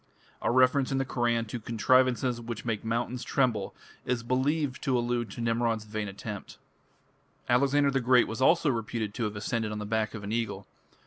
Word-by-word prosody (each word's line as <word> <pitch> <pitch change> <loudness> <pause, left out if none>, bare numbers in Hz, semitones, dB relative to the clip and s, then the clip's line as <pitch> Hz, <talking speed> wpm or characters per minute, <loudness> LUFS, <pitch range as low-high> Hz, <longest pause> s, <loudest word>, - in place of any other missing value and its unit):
A - - 0
reference 130 +2 +3
in 135 - +1
the 135 - 0
Koran 120 -3 0
to 115 +2 -5
"contrivances... 125 +2 +2
which 115 -1 -6
make 115 -3 -2
mountains 120 +2 -2
tremble" 115 -8 0 0.3
is 125 -2 -1
believed 130 +3 0
to 130 -3 +1
allude 120 -1 -1
to 110 - -7
Nimrod's 115 -1 0
vain 105 0 -4
attempt. 100 +1 -7 0.9
Alexander 140 +3 +3
the 135 - +1
Great 125 0 +4
was 110 +3 -5
also 155 +1 +4
reputed 115 -2 -3
to 115 +1 -2
have 105 0 -3
ascended 110 +1 -2
on 105 - -4
the 105 - -4
back 110 +1 -1
of 105 - -7
an 100 - -5
eagle. 105 -4 -2
120 Hz, 185 wpm, -28 LUFS, 110-130 Hz, 0.9 s, Great